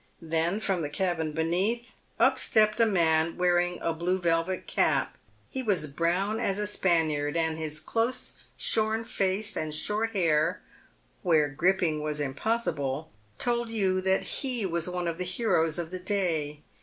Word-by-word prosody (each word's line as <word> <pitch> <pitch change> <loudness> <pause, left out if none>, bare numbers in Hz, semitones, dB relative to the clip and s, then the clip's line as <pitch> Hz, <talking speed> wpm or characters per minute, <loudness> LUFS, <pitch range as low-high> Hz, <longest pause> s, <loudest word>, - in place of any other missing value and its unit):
Then, 165 +4 0
from 195 -5 0
the 145 - -2
cabin 165 -2 -1
beneath, 185 +10 -1 0.3
up - - +4
stepped 215 0 +3
a 230 - +5
man 165 -4 +2
wearing 175 0 +2
a 165 - 0
blue 175 +3 0
velvet 170 +1 0
cap. - - +1 0.4
He 265 - -3
was 200 -10 +1
brown 175 +8 0
as 195 -4 0
a 210 - -1
Spaniard, 165 -6 +1
and 160 -1 +1
his 155 -1 -4
close 230 +9 -1 0.2
shorn 220 +1 +1
face 200 +1 -1
and 155 -1 -2
short 215 +7 -1
hair 155 -5 +2 0.3
— - - -37
where 155 -4 +3
gripping 165 +1 +1
was 150 0 -2
impossible 145 - -1
— 105 0 -35
told 240 -1 0
you 190 -4 +1
that 190 0 +1
he 250 -6 0
was 170 -1 -1
one 180 -1 -2
of 165 +1 -3
the - - 0
heroes 180 -4 +1
of 170 -1 -4
the 185 - -4
day. 170 -7 -1
175 Hz, 165 wpm, -28 LUFS, 160-205 Hz, 0.4 s, a